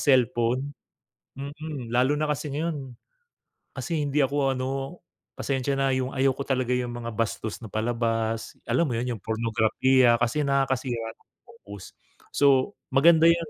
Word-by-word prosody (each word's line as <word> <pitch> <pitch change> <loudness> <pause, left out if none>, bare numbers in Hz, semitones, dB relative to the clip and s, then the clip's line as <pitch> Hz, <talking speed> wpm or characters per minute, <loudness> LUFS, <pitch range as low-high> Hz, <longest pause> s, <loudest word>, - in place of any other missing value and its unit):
cellphone. 125 +3 0 0.7
Mm, 140 -3 -6
lalo 130 +4 +3
na 155 - 0
kasi 150 0 -2
ngayon 145 -4 -4 0.7
kasi 160 -4 -2
hindi 145 +1 0
ako 140 0 +2
ano, 130 - -1 0.7
pasensya 135 0 -1
na, 135 - +2
'yung 130 0 -1
ayaw 135 -1 +2
ko 140 - -4
talaga 130 -2 0
'yung 125 -1 -2
mga 115 -1 -6
bastos 110 0 -3
na 110 - -9
palabas, 115 0 -1
alam 170 - +2
mo 145 - -1
'yun, 125 0 -2
'yung 105 - -12
pornograpiya 115 +2 +3
kasi 125 +6 +1
nakakasira 130 -4 -1
ng - - -34 0.2
focus. 100 - -12 0.4
So, 135 -2 +4 0.2
maganda 160 +4 +6
'yung 165 -2 -1
130 Hz, 145 wpm, -26 LUFS, 115-140 Hz, 0.7 s, maganda